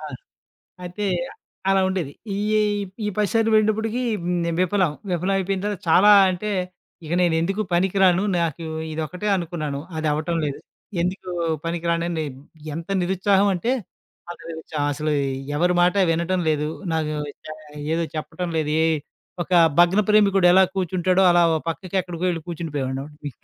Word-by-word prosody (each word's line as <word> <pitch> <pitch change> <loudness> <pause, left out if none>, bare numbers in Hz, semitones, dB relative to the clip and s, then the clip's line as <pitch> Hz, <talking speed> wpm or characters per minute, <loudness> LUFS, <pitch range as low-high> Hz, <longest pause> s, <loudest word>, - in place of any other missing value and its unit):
ఆ! 155 - -9 0.8
అయితే, 180 +4 -5 0.7
అలా 195 0 +4
ఉండేది. 175 -7 -2 0.2
ఇయ్యేయి 210 0 +1 0.3
ఈ - - 0
10 210 -2 +1
సార్లు 225 -1 +2
పోయినటప్పుడికీ 220 +3 +1 0.2
హ్మ్, 180 0 0
నే 170 - 0
విఫలం. 185 -3 +2 0.2
విఫలవయిపోయిన 190 +2 0
తర్వాత 205 -3 -2
చాలా 205 +5 +6 0.2
అంటే, 200 +4 -3 0.6
ఇక 160 - -5
నేనెందుకు 175 +4 +1
పనికి 190 +2 +1
రాను. 185 +1 +4 0.2
నాకు 165 -1 -2 0.3
ఇదొక్కటే 175 +6 -4
అనుకున్నాను, 155 -5 -4 0.2
అదవ్వటం 155 +2 -1
లేదు. 145 -2 -4 0.4
ఎందుకూ 185 +1 -3 0.3
పనికి 170 0 -3
రానని 170 -1 -1 0.5
ఎంత 165 +3 -6
నిరుత్సాహవంటే 195 +3 +2 0.6
అంత - - -9
నిరుత్సాహం. 155 -2 -4
అసలూ 150 +1 -2 0.4
ఎవరి 175 +2 +2
మాట 180 +2 +4 0.2
వినటం 170 +3 0
లేదు, 150 0 0 0.2
నాకూ 155 -1 -1 0.3
చ - - -9 0.5
ఏదో 170 0 0
చెప్పటం 160 +3 -4
లేదు, 150 -1 0
ఏ - - +3 0.6
ఒక 180 - -9 0.3
భగ్న 175 +4 +5
ప్రేమికుడెలా 195 -3 +5
కూర్చుంటాడో 185 +1 +1
అలా 175 0 +5
ఓ - - +2
పక్కకెక్కడికో 180 0 -3
యెళ్లి 165 -3 -2
కూర్చుండిపోయేవాడిని. 145 -2 -4
175 Hz, 135 wpm, -23 LUFS, 160-195 Hz, 0.8 s, చాలా